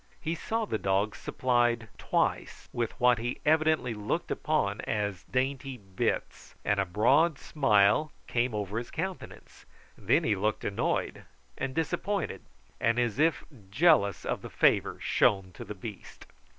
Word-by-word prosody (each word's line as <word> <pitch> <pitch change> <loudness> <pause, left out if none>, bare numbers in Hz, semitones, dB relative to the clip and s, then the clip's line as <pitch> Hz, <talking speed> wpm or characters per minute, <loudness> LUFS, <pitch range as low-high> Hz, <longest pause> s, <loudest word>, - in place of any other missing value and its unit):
He 160 - -2
saw 225 +6 -2
the 110 - -2
dog 100 +2 0
supplied 120 -2 0
twice - - -1
with 120 +1 -3
what 125 -2 +4
he 120 +2 -3
evidently 155 -5 +3
looked 105 -1 -3
upon - - 0
as 105 -4 -2
dainty 135 +1 -2
bits, 95 -3 -3
and 105 -1 +2
a 100 - +1
broad 135 - +3
smile 135 +1 +3
came 120 -1 0
over 105 +1 -2
his 120 - -7
countenance. 185 +3 -7 0.3
Then - - +2
he 105 - +2
looked 105 +2 -1
annoyed 100 - -1 0.3
and 130 0 -4
disappointed, 195 +5 -2 0.4
and 115 +1 +2
as 120 0 0
if 160 0 +2 0.3
jealous 100 - +3
of - - -2
the - - -8
favour - - +2
shown 95 -2 +2
to - - -9
the 105 - -7
beast. 100 +1 -9
120 Hz, 145 wpm, -29 LUFS, 105-145 Hz, 0.4 s, what